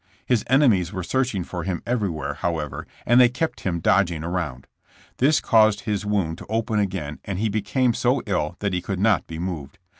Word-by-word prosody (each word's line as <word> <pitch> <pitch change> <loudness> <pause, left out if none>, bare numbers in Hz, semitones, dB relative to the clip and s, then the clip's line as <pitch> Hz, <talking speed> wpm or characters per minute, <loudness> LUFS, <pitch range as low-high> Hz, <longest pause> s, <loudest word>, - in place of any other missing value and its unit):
His 120 -4 +2
enemies 115 - +4
were 95 -3 -4
searching 125 -3 0
for 90 +1 -5
him 90 -1 -3
every 115 -5 0
where, 80 -3 -4
however, 80 -4 -3 0.2
and 120 +2 +6
they 125 - +7
kept 155 +7 -2
him 85 -3 -2
dodging 85 -3 +2
around. 85 -7 -3 0.5
This 145 +4 +4
caused 110 -2 +4
his 105 -1 -2
wound 90 -6 0
to - - -11
open 110 0 0
again 90 -7 -3
and 100 -2 -4
he 110 +3 0
became 110 +4 +1
so 125 +4 +1
ill 85 -6 -1
that 100 -2 -1
he 90 - 0
could 95 0 -4
not 105 -2 +2
be 80 - -7
moved. 80 -6 -5
100 Hz, 200 wpm, -23 LUFS, 85-115 Hz, 0.5 s, they